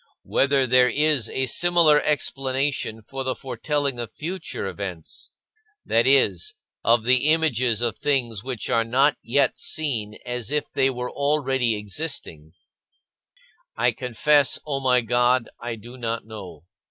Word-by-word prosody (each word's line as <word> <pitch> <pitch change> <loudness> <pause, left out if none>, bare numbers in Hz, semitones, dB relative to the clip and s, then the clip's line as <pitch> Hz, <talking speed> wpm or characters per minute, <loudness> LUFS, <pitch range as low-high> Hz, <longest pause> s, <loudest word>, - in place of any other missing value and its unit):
Whether 135 -1 +2
there 125 0 +4
is 150 -1 +2
a 130 - -1
similar 165 +2 +4
explanation 135 -5 -1
for 135 +5 -5
the 130 -1 -1
foretelling 140 -1 -2
of 115 -2 -5
future 170 - -5
events 95 -4 -6 0.6
that 115 +2 +2
is, 105 -11 +3 0.3
of 115 0 +3
the 130 +4 +3
images 125 -8 +2
of 115 -2 -2
things 120 -8 0
which 125 -4 -4
are 115 - +2
not 135 +5 +2
yet 130 +2 +1
seen 115 -9 -2
as 125 0 -3
if 150 0 -1
they 135 - +2
were 125 -1 -4
already 135 -5 +1
existing 100 - -5 1.2
I - - +3
confess, 135 +3 +2
O 140 -2 -2
my 125 -2 +3
God, 120 +1 +1
I 120 0 -4
do 120 +4 -12
not 115 -1 -3
know. 95 -8 -10
125 Hz, 140 wpm, -24 LUFS, 115-140 Hz, 1.2 s, there